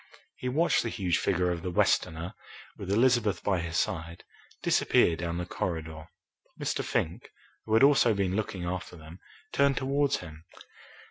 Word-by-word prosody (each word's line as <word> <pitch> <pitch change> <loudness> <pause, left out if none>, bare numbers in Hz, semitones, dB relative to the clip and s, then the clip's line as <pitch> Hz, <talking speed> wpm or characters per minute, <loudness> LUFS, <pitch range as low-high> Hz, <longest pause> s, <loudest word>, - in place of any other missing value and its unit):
He 125 - -4
watched 160 +7 +2
the 115 - -3
huge 90 -6 0
figure 90 0 +1
of 85 -1 -3
the 90 - -3
Westerner, 85 0 +1 0.4
with 95 - -8
Elizabeth 115 0 +2
by 95 -3 +1
his 85 0 -3
side, 85 -1 -2 0.4
disappear 85 - +3
down 85 0 -3
the 90 - -3
corridor. 80 -3 -4 0.5
Mr. - - -1
Fink, 80 - -2 0.4
who 110 - +1
had 115 - +5
also 135 -5 +5
been 95 -1 0
looking 105 -4 -3
after 90 0 -4
them, 80 +2 -12 0.3
turned 140 -1 +3
towards 140 +1 +1
him. 80 -2 -11
90 Hz, 155 wpm, -28 LUFS, 85-115 Hz, 0.5 s, had